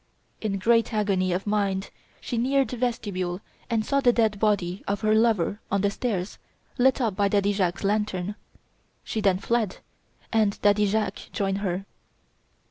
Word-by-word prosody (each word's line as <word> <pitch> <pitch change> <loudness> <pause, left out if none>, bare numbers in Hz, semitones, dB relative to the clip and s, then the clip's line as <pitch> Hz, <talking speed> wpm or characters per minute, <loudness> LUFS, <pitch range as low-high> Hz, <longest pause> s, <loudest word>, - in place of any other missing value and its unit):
In 205 -3 -1
great 230 +5 +3
agony 195 -3 +1
of 180 +2 -1
mind 200 -2 0 0.3
she 245 - -4
neared 265 +3 +2
the 250 - -5
vestibule 200 -7 -2 0.3
and 225 -2 0
saw 275 - +2
the 250 -3 +5
dead 220 -4 +1
body 200 -4 0
of 200 0 -1
her 215 -1 +3
lover 220 -3 +2
on 200 0 +1
the 200 0 +2
stairs 200 -4 -3 0.4
lit 260 +2 +4
up 225 -6 0
by 200 0 +2
Daddy 200 0 +2
Jacques' 185 -2 -1
lantern. 205 -2 0 0.7
She 220 - -3
then 195 -3 +3
fled; 220 0 -1 0.6
and 215 -3 +2
Daddy 205 0 +4
Jacques 205 -1 -2
joined 195 -1 -1
her. 195 -1 -2
205 Hz, 160 wpm, -26 LUFS, 195-225 Hz, 0.7 s, the